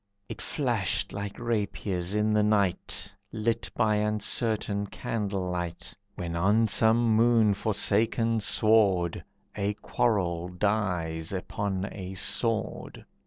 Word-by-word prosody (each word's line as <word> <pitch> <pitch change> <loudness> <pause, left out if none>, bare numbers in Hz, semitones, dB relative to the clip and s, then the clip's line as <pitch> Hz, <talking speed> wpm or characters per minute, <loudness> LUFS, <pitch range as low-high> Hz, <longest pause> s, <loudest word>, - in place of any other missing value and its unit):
It 115 - -7
flashed 120 - -1
like 100 0 -5
rapiers 100 -5 -2
in 105 0 +2
the 105 - +4
night 100 -1 0 0.2
Lit 115 +1 -1
by 110 -2 +2
uncertain 105 -1 0
candle 100 -3 -3
light, 85 -1 -4 0.2
When 85 -2 -4
on 105 +6 +3
some 110 +1 +4
moon 115 -2 +4
forsaken 110 +2 +1
sward 100 -5 +3 0.3
A 100 0 -1
quarrel 90 -8 0
dies 90 -4 -1
upon 95 0 -3
a 95 -1 -7
sword. 115 +3 -1
105 Hz, 110 wpm, -28 LUFS, 95-110 Hz, 0.3 s, the